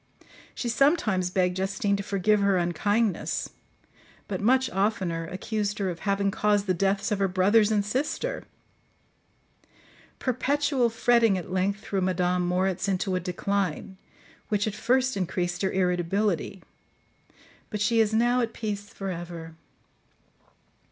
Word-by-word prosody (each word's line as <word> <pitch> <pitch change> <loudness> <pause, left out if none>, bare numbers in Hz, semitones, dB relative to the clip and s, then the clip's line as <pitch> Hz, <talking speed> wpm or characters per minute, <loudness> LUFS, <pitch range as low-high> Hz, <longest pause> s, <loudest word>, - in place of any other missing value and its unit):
She 245 - -3
sometimes 235 - +2
begged 180 0 0
Justine 195 +1 0
to 200 - -3
forgive 200 +2 +1
her 200 -1 +3
unkindness, 195 +4 0 0.8
but 190 -2 -3
much 260 +4 +3
oftener 185 -4 -1
accused 205 +3 -3
her 195 -3 -1
of 170 - -8
having 200 -1 0
caused 205 0 +1
the 185 - +1
deaths 195 +3 0
of 205 - 0
her 195 - +2
brothers 205 +4 +3
and 205 -2 +1
sister. 300 - -2 1.7
Perpetual 265 0 +1
fretting 230 -2 +3
at 180 - -7
length 195 +2 0
threw 195 -2 -2
Madame 180 -1 +1
Moritz 185 +2 0
into 190 0 0
a - - +1
decline, 190 0 -2 0.5
which 205 -1 +1
at 215 - -2
first 255 +4 +1
increased 175 -2 -2
her 190 - +1
irritability, 185 +1 0 1.1
but 210 - -4
she 225 +3 +2
is 220 -1 +3
now 240 +3 +3
at 230 -1 -2
peace 205 -2 -4
for 195 -3 -5
ever. 170 -2 -7
200 Hz, 135 wpm, -26 LUFS, 185-220 Hz, 1.7 s, her